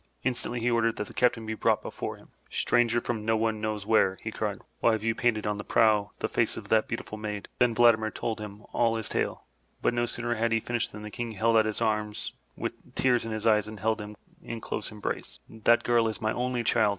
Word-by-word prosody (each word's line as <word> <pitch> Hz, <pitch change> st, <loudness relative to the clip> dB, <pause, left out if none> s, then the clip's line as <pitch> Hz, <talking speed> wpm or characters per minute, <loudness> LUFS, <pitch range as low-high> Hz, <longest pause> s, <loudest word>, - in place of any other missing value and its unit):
Instantly 120 Hz, -1 st, 0 dB
he 120 Hz, +1 st, +1 dB
ordered 115 Hz, -1 st, +2 dB
that 105 Hz, -, -3 dB
the -, -, -12 dB
captain 120 Hz, -2 st, +2 dB
be 110 Hz, -, -2 dB
brought -, -, +1 dB
before -, -, -5 dB
him. -, -, -19 dB, 0.2 s
Stranger 120 Hz, -1 st, +2 dB
from 115 Hz, -3 st, -3 dB
no 110 Hz, +1 st, +2 dB
one 110 Hz, -1 st, 0 dB
knows 110 Hz, -2 st, -2 dB
where," 100 Hz, -3 st, +3 dB
he -, -, -3 dB
cried, -, -, -2 dB, 0.2 s
"why 115 Hz, -, +4 dB
have 110 Hz, -1 st, -2 dB
you 115 Hz, 0 st, +2 dB
painted 115 Hz, -3 st, +1 dB
on 105 Hz, -1 st, -1 dB
the -, -, -4 dB
prow 105 Hz, -3 st, +3 dB
the -, -, +1 dB
face -, -, +1 dB
of -, -, -8 dB
that 110 Hz, -1 st, +3 dB
beautiful 110 Hz, -2 st, -5 dB
maid?'' 105 Hz, -1 st, -4 dB
Then 120 Hz, -2 st, +3 dB
Vladimir 110 Hz, -2 st, +5 dB
told 110 Hz, 0 st, -3 dB
him 105 Hz, 0 st, -8 dB
all 115 Hz, -1 st, +2 dB
his 110 Hz, -1 st, -3 dB
tale, -, -, -2 dB, 0.3 s
but -, -, +1 dB
no 120 Hz, 0 st, +1 dB
sooner 120 Hz, 0 st, -1 dB
had 115 Hz, 0 st, +1 dB
he 115 Hz, -, +3 dB
finished 120 Hz, +1 st, -2 dB
than 105 Hz, 0 st, -9 dB
the 105 Hz, -, -7 dB
King 120 Hz, -1 st, -4 dB
held 115 Hz, +3 st, +2 dB
out 110 Hz, -1 st, +5 dB
his 110 Hz, +1 st, -1 dB
arms 105 Hz, -2 st, -1 dB, 0.2 s
with -, -, -6 dB
tears 125 Hz, -3 st, +2 dB
in 115 Hz, -, -4 dB
his 110 Hz, -1 st, -3 dB
eyes, 105 Hz, -2 st, +4 dB
and 110 Hz, -1 st, -8 dB
held 110 Hz, +1 st, 0 dB
him 105 Hz, 0 st, -8 dB, 0.3 s
in 115 Hz, -8 st, -6 dB
close -, -, -3 dB
embrace. 105 Hz, -1 st, -5 dB
'That 110 Hz, +1 st, +3 dB
girl 120 Hz, -1 st, +3 dB
is 110 Hz, -, -3 dB
my 110 Hz, 0 st, 0 dB
only 125 Hz, -1 st, -1 dB
child!'' 110 Hz, -2 st, +3 dB
110 Hz, 240 wpm, -28 LUFS, 105-120 Hz, 0.3 s, Vladimir